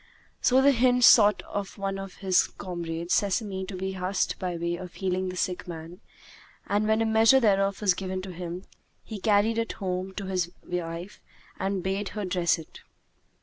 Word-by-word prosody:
So 260 +1 +4
the 280 - +7
hind 250 0 +3
sought 210 -4 +7
of 200 -1 -5
one 195 -1 -3
of 195 -1 -8
his 185 -1 +4
comrades 170 -1 -4
sesame 200 -1 0
to 195 - -6
be 190 +1 -3
husked 190 +1 -1
by 180 -2 -3
way 170 +1 -2
of 180 0 -9
healing 185 -1 -1
the 180 - -6
sick 180 0 -2
man; 170 +3 -8 0.6
and, 205 +1 0
when 220 +1 +3
a - - 0
measure 225 +4 +5
thereof 195 -4 +2
was 195 -3 +4
given 185 0 -4
to 190 -1 -7
him, 175 +1 -6 0.4
he 215 - -7
carried 215 +2 +2
it 230 - -2
home 185 -1 -4
to 200 - -5
his 180 -2 -1
wife 175 +2 -5 0.4
and 195 -1 -1
bade 195 +2 -2
her 210 - -2
dress 180 -2 +1
it. 160 - -12
190 Hz, 185 wpm, -27 LUFS, 180-205 Hz, 0.6 s, the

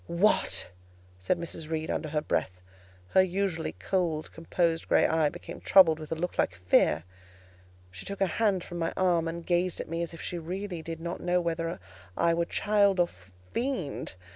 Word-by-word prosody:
"What?" 175 +5 +2 0.5
said 95 - +1
Mrs. 165 -2 -6
Reed 160 -1 -2
under 155 - -2
her 150 0 0
breath: 90 -1 -1 0.5
her 190 - +6
usually 185 -2 -1
cold 170 -5 -1
composed 165 0 0
grey - - +4
eye 160 -2 +3
became - - -9
troubled 165 -5 +6
with 155 -1 -9
a - - +1
look 175 +3 -4
like 90 - +2
fear; 85 -3 +3 0.9
she 95 +1 -10
took 200 0 -6
her 195 - +4 0.2
hand 200 -5 +3
from 175 -1 -7
my 165 - -1
arm, 175 -3 +2
and 165 0 -5
gazed 175 0 +1
at - - -4
me 165 +1 -2
as 170 - -3
if 165 - -10
she 175 - -4
really 180 +1 -4
did 165 0 -6
not 170 +1 -5
know 180 0 +2
whether 165 - -2 0.4
I 170 0 +3
were 170 0 +1
child 200 0 +2
or 175 -1 +4 0.4
fiend. 235 - -2
170 Hz, 185 wpm, -29 LUFS, 160-185 Hz, 0.9 s, her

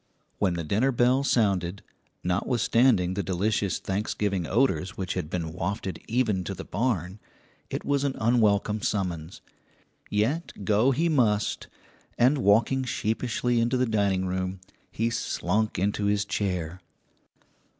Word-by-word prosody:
When 95 -4 +1
the 85 - -3
dinner 110 - +1
bell 125 +2 +3
sounded, 100 -7 +1 0.4
notwithstanding 105 +1 +2
the 100 - -1
delicious 95 0 0
Thanksgiving 100 -2 -2
odours 95 - +1
which 95 -2 -2
had 75 - -4
been 80 -2 -3
wafted 95 -1 -3
even 110 -5 +1
to 95 - -4
the 95 - -8
barn, 100 -3 -2 0.5
it - - -4
was 140 -1 +1
an 140 -2 -1
unwelcome 110 -2 +2
summons; 90 -5 -3 0.7
yet 110 - -1
go 110 +6 +3
he 150 +6 +1
must, 115 -9 +1 0.5
and 130 +4 +4
walking 115 +5 +3
sheepishly 120 0 -1
into 120 +3 +1
the 130 - +2
dining 100 -4 +1
room, 95 0 -2 0.3
he 115 +1 -1
slunk 110 -2 -1
into 100 +2 0
his 100 0 +1
chair. 90 -4 -2
105 Hz, 130 wpm, -26 LUFS, 95-120 Hz, 0.7 s, and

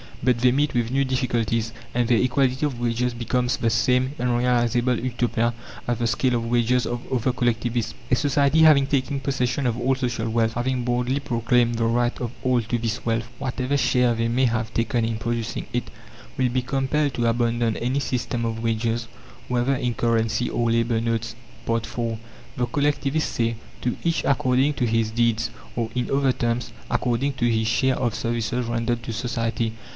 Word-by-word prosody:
But 125 -2 +3
they 125 +1 +4
meet 145 +1 +1
with 120 -1 0
new 135 +1 +2
difficulties, 115 -4 0 0.2
and 120 -1 +2
their 120 -1 +4
equality 130 +2 +1
of 135 -5 -3
wages 120 +1 0
becomes 125 +1 0
the 115 - +1
same 125 +3 +2
unrealizable 120 0 +2
Utopia 120 -1 0 0.3
as 120 -1 0
the 120 - -1
scale 125 +2 +1
of 115 -1 -1
wages 120 +1 +2
of 120 0 -3
other 130 0 +1
collectivists. 120 -2 -1 0.2
A - - +6
society 140 +2 +2
having 150 -4 +7
taken 140 0 0
possession 135 -1 -1
of 120 0 -1
all 130 +2 +2
social 120 -3 -2
wealth, 115 0 +1
having 125 +1 -1
boldly 125 +3 0
proclaimed 120 -2 +1
the 115 0 0
right 120 +1 +1
of 120 -2 -3
all 125 -1 +3
to 115 +2 -2
this 115 +1 -2
wealth 115 -1 0
whatever 130 +1 -1
share 125 -3 +3
they 115 0 0
may 125 +3 +2
have 115 -2 -1
taken 115 0 +1
in 115 -1 -2
producing 115 0 -3
it 120 - -2 0.5
will 130 -1 +2
be 125 +1 0
compelled 135 +2 0
to 120 - 0
abandon 115 -1 +1
any 125 +4 0
system 120 -3 -2
of 115 0 -3
wages, 115 0 -1 0.4
whether 125 +2 +1
in 125 -2 -1
currency 115 +1 +1
or 115 -1 0
labour 115 0 +1
notes. 115 -1 -2 0.3
IV 115 0 -1 0.6
The 125 -1 0
collectivists 145 +1 0
say, 115 0 0 0.3
"To 125 - -1
each 165 -1 +1
according 135 +1 +2
to 125 - 0
his 115 -1 +1
deeds"; 115 -1 +1 0.3
or, 115 -2 -1
in 125 -1 -1
other 135 -1 +3
terms, 120 0 -2 0.2
according 125 +3 0
to 120 -2 +1
his 110 -1 +1
share 130 +3 +2
of 120 -4 0
services 120 +1 -1
rendered 120 0 -1
to 115 - -4
society. 115 -1 -2
120 Hz, 180 wpm, -24 LUFS, 115-130 Hz, 0.6 s, having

